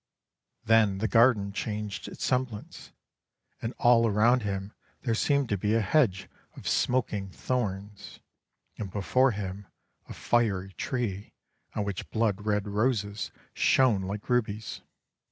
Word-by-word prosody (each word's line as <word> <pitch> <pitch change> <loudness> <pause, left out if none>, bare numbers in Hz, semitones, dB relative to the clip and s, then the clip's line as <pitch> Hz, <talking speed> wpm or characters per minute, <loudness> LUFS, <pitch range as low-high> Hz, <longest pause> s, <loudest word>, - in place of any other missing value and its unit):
Then 110 -3 +4
the 110 +3 0
garden 115 -4 +4
changed 105 -1 -4
its - - -5
semblance, 125 -5 -3 0.7
and 115 +2 -4
all 120 -1 +5
around 115 +4 +4
him 100 0 -4 0.3
there 120 -4 0
seemed 140 +4 +2
to 100 - 0
be 105 +3 +1
a 115 - +3
hedge 105 -3 +2 0.3
of - - -8
smoking 105 -6 0
thorns 105 -2 -4 0.6
and 100 - -4
before 125 +7 +2
him 100 -2 -5 0.4
a - - -6
fiery 95 -5 0
tree 105 -6 -3 0.4
on 105 - 0
which 100 -2 -5
blood 110 -2 0
red 105 -1 +1
roses 105 -1 -1 0.2
shone 125 -7 +3
like 100 +2 -5
rubies. 110 -3 -1
105 Hz, 130 wpm, -28 LUFS, 100-120 Hz, 0.7 s, all